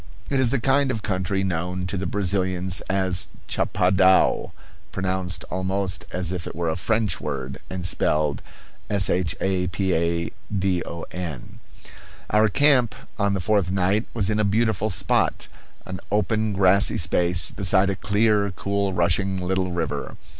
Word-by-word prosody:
It 135 - +2
is 130 -2 +3
the 135 - +1
kind 135 +3 +2
of 110 -4 -3
country 95 0 -1
known 90 0 -2
to 90 - -2
the 95 -1 -2
Brazilians 95 -1 0
as 95 -4 +1 0.2
chapadao 95 +1 +2 0.4
pronounced 95 -2 -2
almost 95 +1 -1
as 90 -1 -2
if 90 -2 -4
it - - -7
were 85 0 -1
a - - -2
French 105 +2 0
word 65 -1 -5
and 90 -1 -5
spelled 75 -3 +1 0.5
shapadon. 90 -2 0 1.9
Our 110 0 +4
camp 130 -2 +3 0.2
on 100 -1 +1
the - - -1
fourth 100 -1 +1
night 95 +4 +1
was 105 -2 +1
in 105 - 0
a - - +2
beautiful 110 0 +1
spot, 90 - +1 0.4
an 95 -1 -6
open 110 0 0
grassy 100 +3 +3
space, 90 -1 +2
beside 95 0 +2
a - - -2
clear, 105 +1 +1
cool, 100 -1 -1
rushing 90 +2 +1
little 95 0 -1
river. 80 -4 -4
95 Hz, 135 wpm, -23 LUFS, 90-105 Hz, 1.9 s, Our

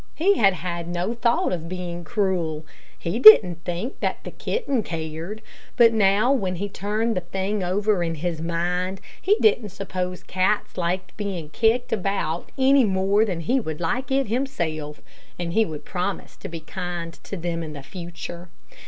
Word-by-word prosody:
He 390 +5 +3
had 195 -3 +5
had 170 -1 -4
no 175 +5 -2
thought 235 -4 +1
of 165 -2 -4
being 175 -1 -5
cruel. 175 -7 -1 0.3
He 170 +8 -3
didn't 185 -8 +9
think 180 +9 -4
that - - -2
the - - -7
kitten 355 - -1
cared; 165 +4 -5 0.3
but 230 -1 +7
now 210 +3 +4
when 190 -9 -1
he 200 +3 -3
turned 215 +4 -1
the 180 - 0
thing 190 +3 -2
over 200 +2 +1
in 165 -1 -1
his 165 0 -3
mind, 180 +3 -1 0.2
he 405 +3 +4
didn't 245 - +3
suppose 185 -2 -4
cats 190 +3 0
liked 180 +1 -2
being 190 -7 -4
kicked 230 +7 +2
about 195 -5 -2
any 270 0 +5
more 195 +1 +3
than 180 -6 -3
he 250 +11 +1
would 160 -10 -5
like 245 +11 -1
it 270 0 +2
himself, 170 - -3 0.4
and 170 -1 -3
he 225 +2 +4
would 155 -5 -7
promise 185 +2 -3
to - - -8
be 165 -1 -6
kind 175 0 -5
to 200 - -5
them 170 -1 -3
in 155 -3 -6
future. 175 +1 -8
185 Hz, 170 wpm, -24 LUFS, 170-215 Hz, 0.4 s, didn't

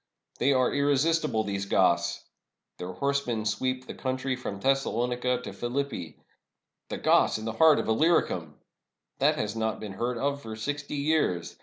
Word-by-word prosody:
They 135 - +3
are 130 -2 +2
irresistible, 145 -3 +2
these 100 -1 -3
Goths! - - +2 0.6
Their 90 +1 -5
horse 140 +6 -1
men 110 -3 -2
sweep 130 +5 -1
the - - -7
country 130 0 -2
from 100 -5 -6
Thessalonica 125 0 0
to - - -6
Philippi. 120 - -3 0.7
The - - -3
Goths - - +3
in 110 - -7
the 110 - -1
heart 155 +6 +5
of - - -2
Illyricum! 110 - +1 0.6
That - - +4
has 105 +1 -3
not 110 -1 -1
been 105 -3 -6
heard 120 +4 -2
of 140 +3 -1
for 110 -3 -7
sixty 145 +6 -4
years. 140 - 0
125 Hz, 160 wpm, -28 LUFS, 110-140 Hz, 0.7 s, heart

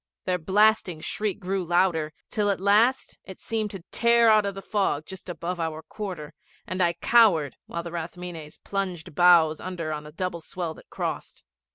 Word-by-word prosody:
Their 180 -1 0
blasting 195 -1 +3
shriek 210 +2 -2
grew 190 0 -2
louder, 170 -2 +1 0.2
till 210 -2 0
at 200 - 0
last 215 +7 +2
it 190 - -11
seemed 220 -2 -2
to 195 -4 -8
tear 235 -1 +5
out 215 -2 +4
of 200 - -4
the 195 - -6
fog 190 -8 0
just 190 -1 -9
above 175 +1 -4
our 160 -1 -3
quarter, 175 -8 -7 0.3
and 185 +1 -3
I 170 -1 +3
cowered 170 - +4
while 170 - -4
the 170 - -7
Rathmines 170 -2 -7
plunged 185 -6 -3
bows 165 -1 +5
under 175 -4 -4
on 150 0 -6
a - - -11
double 170 0 -4
swell 170 0 -4
that - - -17
crossed. - - -5
180 Hz, 180 wpm, -26 LUFS, 165-200 Hz, 0.3 s, tear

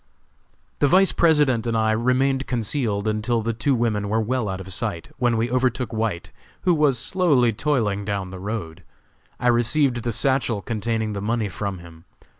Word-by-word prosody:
The 145 - +4
Vice 190 +5 +5
President 145 -8 +3
and 115 -1 0
I 110 0 +2
remained 130 +4 +1
concealed 110 -3 -1
until 110 +2 0
the 115 +1 -1
two 135 +5 0
women 110 -4 -1
were 110 +2 +1
well 115 -1 -1
out 95 0 -4
of 95 0 -6
sight, 85 -2 -3
when 120 -2 +2
we 115 +2 -1
overtook 125 -2 0
White, 105 -5 -2 0.3
who 180 - +3
was 150 -5 +2
slowly 140 -7 +2
toiling 105 -6 0
down 100 -2 -3
the 95 - -8
road. 95 -5 -5 0.6
I 125 - 0
received 120 +2 +2
the 120 - -2
satchel 120 -3 0
containing 110 -1 -2
the 100 - -4
money 110 0 -1
from 100 +1 -4
him. 85 -1 -14
115 Hz, 175 wpm, -23 LUFS, 105-130 Hz, 0.6 s, Vice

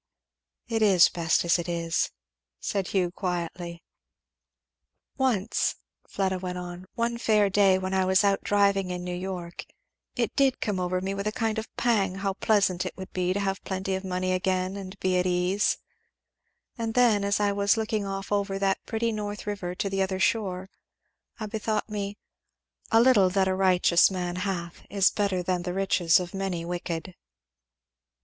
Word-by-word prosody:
"It 225 -2 -1
is 195 -5 +6
best 170 0 +1
as 170 +1 +3
it 170 +1 -4
is," 165 -1 0 0.5
said 195 -3 -2
Hugh 180 -3 0
quietly. 175 -2 -4 1.3
"Once," 235 -6 +1 0.3
Fleda 190 -1 -1
went 180 0 -4
on, 180 +1 -7
"one 235 0 -1
fair 210 -3 +3
day 195 -1 +4
when 190 0 -3
I 190 -1 +2
was 190 +2 +4
out 200 -1 +2
driving 200 -2 +2
in 180 0 -4
New 180 0 -4
York, 180 -1 -5 0.5
it - - -1
did 275 -2 +3
come 205 -3 -1
over 180 0 -1
me 190 +1 -2
with 200 +1 -3
a - - +1
kind 220 0 -1
of 220 - -6
pang 205 -6 +1
how 195 0 -2
pleasant 195 -3 +2
it 185 - -6
would 190 -1 -9
be 180 0 0
to 195 - 0
have 195 -1 -2
plenty 190 0 -3
of 190 +1 -2
money 185 0 -1
again 185 0 0
and 195 0 -8
be 185 -1 +1
at 180 - +1
ease; 180 +3 +1 1.0
and 225 -1 -2
then, 235 -5 +4
as 200 +1 +1
I 205 -1 +2
was 200 +2 +2
looking 220 -1 -1
off 195 0 -5
over 200 -1 0
that 195 0 0
pretty 230 0 0
North 210 -1 -5
river 195 -4 -4
to 200 - -2
the 195 0 -1
other 190 0 -1
shore, 190 -2 0 0.7
I 215 - -3
bethought 215 +1 -2
me, 205 -1 -4 0.7
'A 225 - +6
little 230 -6 +5
that 190 0 +2
a 190 - +1
righteous 185 -2 +4
man 180 -2 -3
hath 180 -3 -4
is 200 -2 +3
better 200 -3 0
than 180 0 0
the 180 0 -4
riches 185 -3 +3
of 180 -1 -6
many 190 -3 -3
wicked.'" 175 0 -4
190 Hz, 175 wpm, -27 LUFS, 180-205 Hz, 1.3 s, is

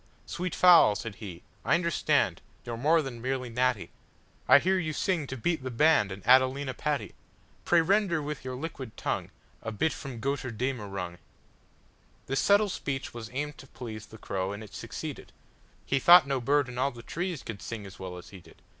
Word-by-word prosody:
"Sweet 180 +1 -4
fowl," 170 - +7
he - - -4
said, 115 -2 -6 0.5
"I - - +3
understandYou 170 -1 +1 0.3
're 120 -1 -4
more 155 +7 +3
than 120 -4 -7
merely 130 0 -2
natty:I 125 +1 0
hear 185 +6 +2
you 155 -3 -2
sing 165 -4 0
to 135 - -5
beat 160 +5 0
the 130 - -4
bandAnd 115 -8 +2
Adelina 130 +1 +4
Patti.Pray 150 - -2
render 190 -1 +2
with 150 -1 -5
your 130 0 -5
liquid 130 -5 -7
tongueA 115 -2 -5
bit 160 +6 +1
from 130 -5 -7
'Götterdämmerung.'"This 115 - -6
subtle 205 +1 +4
speech 135 -6 -4
was 115 -2 -7
aimed 150 +3 -4
to 135 - -12
pleaseThe 110 -3 -9
crow, 95 -2 -3
and 100 +2 -6
it 105 - -13
succeeded:He 135 - -6
thought 175 +3 +8
no 135 -2 -1
bird 145 +2 +2
in 125 0 -6
all 135 +2 +2
the 120 -3 -11
treesCould 165 - -4
sing 115 -3 -6
as 95 - -12
well 90 -1 -6
as 90 - -11
he 95 - -10
did. - - -19
130 Hz, 165 wpm, -29 LUFS, 115-155 Hz, 0.5 s, thought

